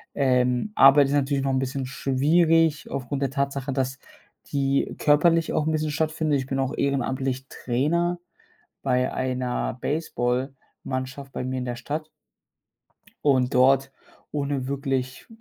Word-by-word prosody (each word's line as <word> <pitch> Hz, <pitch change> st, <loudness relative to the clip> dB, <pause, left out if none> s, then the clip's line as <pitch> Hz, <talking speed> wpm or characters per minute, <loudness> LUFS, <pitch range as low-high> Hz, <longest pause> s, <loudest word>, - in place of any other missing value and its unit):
Ähm, 125 Hz, +5 st, +1 dB
Arbeit 135 Hz, +1 st, +7 dB
ist 140 Hz, -, -2 dB
natürlich 140 Hz, -1 st, +1 dB
noch 135 Hz, -, 0 dB
'n 130 Hz, -, +1 dB
bisschen 135 Hz, 0 st, -3 dB
schwierig 155 Hz, +4 st, +2 dB
aufgrund 140 Hz, +1 st, -4 dB
der 135 Hz, -, +1 dB
Tatsache, 140 Hz, -1 st, -2 dB
dass 130 Hz, 0 st, -2 dB, 0.5 s
die 140 Hz, -1 st, 0 dB
körperlich 165 Hz, +2 st, +3 dB
auch 155 Hz, -, 0 dB
'n -, -, +2 dB
bisschen 155 Hz, -1 st, -1 dB
stattfindet. 155 Hz, -2 st, 0 dB
Ich 130 Hz, -, -5 dB
bin 135 Hz, -, -2 dB
auch 135 Hz, -1 st, -1 dB
ehrenamtlich 135 Hz, -1 st, -1 dB
Trainer 170 Hz, +8 st, 0 dB, 0.7 s
bei 125 Hz, -1 st, +1 dB
einer 125 Hz, -1 st, -2 dB
Baseballmannschaft 130 Hz, -1 st, -3 dB
bei -, -, -4 dB
mir 130 Hz, 0 st, -3 dB
in 125 Hz, -, -3 dB
der 120 Hz, -, -3 dB
Stadt 155 Hz, +4 st, -4 dB, 1.2 s
und 130 Hz, -3 st, +2 dB
dort, 135 Hz, +2 st, +4 dB, 0.4 s
ohne 140 Hz, -3 st, -2 dB
wirklich 135 Hz, -2 st, -3 dB
135 Hz, 135 wpm, -25 LUFS, 130-145 Hz, 1.2 s, Arbeit